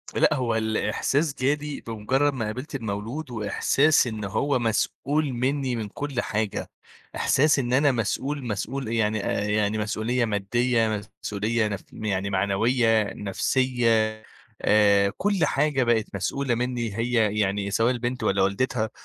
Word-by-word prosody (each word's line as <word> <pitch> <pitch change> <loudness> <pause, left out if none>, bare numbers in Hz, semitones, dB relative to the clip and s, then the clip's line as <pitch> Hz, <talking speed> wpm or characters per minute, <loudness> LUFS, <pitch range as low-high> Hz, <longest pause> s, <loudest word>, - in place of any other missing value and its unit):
لأ، - - +4
هو 120 -3 0
الإحساس 135 +7 0
جالي 145 +2 -1
بمُجرّد 130 +6 0
ما 115 -4 -3
قابلت 130 +7 -5
المولود 115 +5 -4
وإحساس 125 +7 +2
إنه 105 -3 -4
هو 130 +6 0
مسؤول 140 +6 0
منّي 130 +1 -1
من 110 -2 -3
كل 140 -1 -3
حاجة، 105 -1 -2 0.5
إحساس 150 +1 +3
إن 125 -1 -1
أنا 140 +1 +4
مسؤول 130 +4 -2
مسؤول 120 +5 -3
يعني 110 -2 0
آآ، - - 0
يعني 105 0 +1
مسؤولية 110 +3 0
مادّية 110 +1 0 0.2
مسؤولية 110 +2 0
نف 100 -2 -4
يعني 100 -2 -2
معنوية، 110 +3 +2
نفسية، 115 +2 +1 0.5
آآ 100 -2 +4
كل 195 -5 +1
حاجة 140 -2 +1
بقت 115 -3 +2
مسؤولة 135 -3 -1
منّي 120 -3 -2
هي 115 -3 +1
يعني 100 0 0
سواء 115 +4 +2
البنت 120 -1 -3
والّا 100 -2 +2
والدتها، 110 +3 0
115 Hz, 135 wpm, -25 LUFS, 105-130 Hz, 0.5 s, لأ